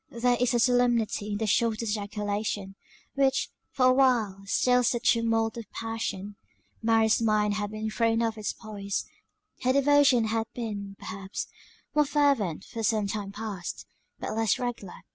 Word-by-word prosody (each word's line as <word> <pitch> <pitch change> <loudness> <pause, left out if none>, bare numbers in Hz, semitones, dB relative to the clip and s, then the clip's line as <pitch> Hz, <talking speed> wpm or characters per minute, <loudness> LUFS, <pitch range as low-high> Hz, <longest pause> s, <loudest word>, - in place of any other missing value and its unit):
There 245 +1 +1
is 245 0 +2
a - - +3
solemnity 240 -4 +2
in - - -1
the 220 - -1
shortest 225 +1 +1
ejaculation, 205 -1 -3 0.4
which, 270 -1 +2 0.2
for 255 - +1
a 255 - +6
while, 240 -7 +2
stills 250 +3 +3
the 240 - -1
tumult 225 -1 +1
of 225 -4 -8
passion. 225 -3 -4 0.4
Mary's 225 0 +3
mind 210 -2 +2
had 205 0 -2
been 215 +1 -4
thrown 230 +1 +1
off 225 -1 0
its 215 -1 -3
poise; 200 -2 -4 0.6
her 255 - +2
devotion 280 -3 +5
had 220 0 -1
been, 205 -4 -5
perhaps, 195 0 -6 0.5
more 300 0 +4
fervent 275 - +1
for 230 - -6
some 215 -1 +1
time 200 0 -4
past; 205 -4 -6 0.3
but - - -4
less 225 -2 +2
regular. 240 -7 -5
225 Hz, 155 wpm, -27 LUFS, 205-245 Hz, 0.6 s, a